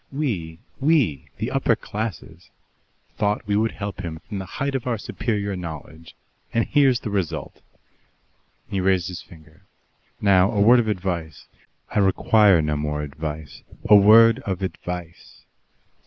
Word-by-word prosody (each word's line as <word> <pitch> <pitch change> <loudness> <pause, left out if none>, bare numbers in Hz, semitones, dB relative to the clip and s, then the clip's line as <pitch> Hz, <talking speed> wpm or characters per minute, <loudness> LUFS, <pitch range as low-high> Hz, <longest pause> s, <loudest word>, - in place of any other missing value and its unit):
We 105 - -3 0.2
we, 135 - +1
the - - -3
upper - - +2
classes 90 -5 -6 0.7
thought 105 +1 0
we 100 0 0
would 110 +2 +1
help 100 -2 -6
him 85 -4 -5
from 100 +4 -7
the 95 - -7
height 140 0 -1
of 130 -2 -3
our 120 -2 0
superior 100 -2 -3
knowledge 80 -1 -9 0.4
and 115 -1 +1
here's 135 -4 +3
the 110 - -5
result!" 85 -6 -3 1.1
He 95 - -2
raised 95 -1 +1
his 90 - -7
finger. 80 +2 -18 0.5
"Now, 95 -2 +4
a 105 - 0
word 120 +5 +6
of 115 - 0
advice." 90 -6 -3 0.5
"I - - 0
require 100 -2 +4
no 75 -1 -1
more 75 0 -2
advice." 75 0 -7 0.3
"A 105 - +9
word 115 +4 +7
of 95 -6 -4
advice. 90 -2 -7
95 Hz, 145 wpm, -23 LUFS, 80-110 Hz, 1.1 s, A